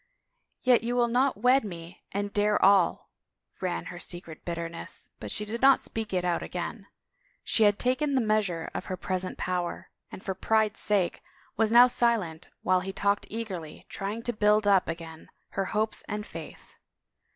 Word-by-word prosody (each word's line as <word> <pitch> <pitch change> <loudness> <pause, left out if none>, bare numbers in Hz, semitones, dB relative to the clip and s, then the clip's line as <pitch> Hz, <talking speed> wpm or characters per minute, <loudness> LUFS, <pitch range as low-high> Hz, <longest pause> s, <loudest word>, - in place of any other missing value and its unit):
" - - -48 0.2
Yet 250 -2 +5
you 240 +1 -1
will 240 -1 +3
not 250 +2 +2
wed 250 +5 +4
me 170 -3 -8
and 200 0 -3
dare 210 0 +3
all," 195 -3 +3 0.5
ran 85 - -2
her 175 - -8
secret 175 -3 -7
bitterness 170 -1 -6
but - - -6
she 210 - -3
did 230 +3 -5
not 270 0 +7
speak 225 -1 -5
it 180 -1 0
out 175 -1 +1
again. 195 +4 -5 0.6
She 220 - +3
had 205 -1 +4
taken 275 +3 +1
the - - +4
measure 210 -7 0
of - - -4
her 185 - -4
present 185 0 -3
power 180 -1 -3 0.2
and - - -9
for 190 - -2
pride's 220 +2 +1
sake 200 -4 0 0.3
was 220 0 +2
now 240 +1 +9
silent 230 -10 0
while 185 0 +3
he 190 +1 -4
talked 200 +1 0
eagerly, 190 -8 -6
trying 205 +4 -4
to 240 - -1
build 210 0 +3
up 195 -4 +4
again 165 -1 -7 0.2
her 195 - -2
hopes 215 +3 -1
and 210 0 -3
faith. - - -10
205 Hz, 175 wpm, -28 LUFS, 180-225 Hz, 0.6 s, now